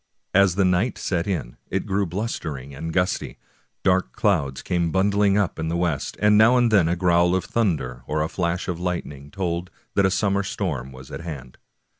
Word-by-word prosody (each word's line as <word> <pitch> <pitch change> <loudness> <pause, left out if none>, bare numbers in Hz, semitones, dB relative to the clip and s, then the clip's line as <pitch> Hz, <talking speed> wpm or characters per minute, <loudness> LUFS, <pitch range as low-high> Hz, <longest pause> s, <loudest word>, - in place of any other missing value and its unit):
As 95 -2 +4
the 100 -1 +3
night 90 +7 +1
set 85 -1 -1
in, 80 -12 -3
it - - -1
grew 100 0 0
blustering 80 - -4
and 80 +4 -5
gusty. 90 +1 -1 0.5
Dark 95 0 +2
clouds 70 -11 0
came 85 -2 0
bundling 100 +2 +3
up 100 -5 0
in 80 - -2
the 85 +1 -1
west, 85 -6 -1
and 105 0 +5
now 120 +3 +6
and 120 -2 +3
then 95 -6 +5
a 85 - +1
growl 85 0 +3
of 95 - -1
thunder 80 - -1
or 75 0 0
a - - -1
flash 85 +1 -2
of 90 -2 -3
lightning 75 -6 -4
told 90 0 -3 0.2
that 100 - +3
a - - +1
summer 100 0 +1
storm 80 -10 -3
was 65 0 -12
at - - -6
hand. 70 -7 -8
90 Hz, 195 wpm, -23 LUFS, 80-100 Hz, 0.5 s, now